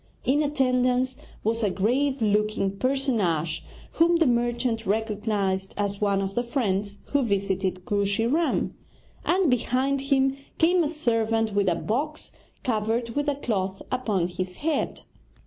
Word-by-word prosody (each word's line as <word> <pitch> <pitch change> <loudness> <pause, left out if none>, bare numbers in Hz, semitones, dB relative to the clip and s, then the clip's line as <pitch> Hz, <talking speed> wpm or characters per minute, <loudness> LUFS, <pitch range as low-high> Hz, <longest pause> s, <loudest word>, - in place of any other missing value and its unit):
In 285 +4 +3
attendance 255 -3 +1 0.3
was 230 +2 0
a 210 - +2
grave 250 +7 +1
looking 210 -2 +1
personage 200 - 0 0.3
whom 340 +1 +4
the 335 -1 +4
merchant 240 -2 0
recognized 205 -2 -1
as 200 0 -1
one 200 -1 +2
of 195 0 -3
the 240 - +1
friends 205 -5 -1
who 285 - +3
visited 195 -4 -1
Kooshy 200 +2 +1
Ram; 315 +8 +1 0.5
and 370 0 +2
behind 260 +3 +1
him 270 -1 +3 0.2
came 345 +2 +4
a 295 - 0
servant 225 -7 +1
with 200 -2 +2
a 170 - +1
box 290 - -3 0.3
covered 230 0 0
with 290 +4 0
a 285 - 0
cloth 195 -8 -2
upon 215 -9 0
his 180 +1 -5
head. 315 -3 0
225 Hz, 140 wpm, -26 LUFS, 200-270 Hz, 0.5 s, whom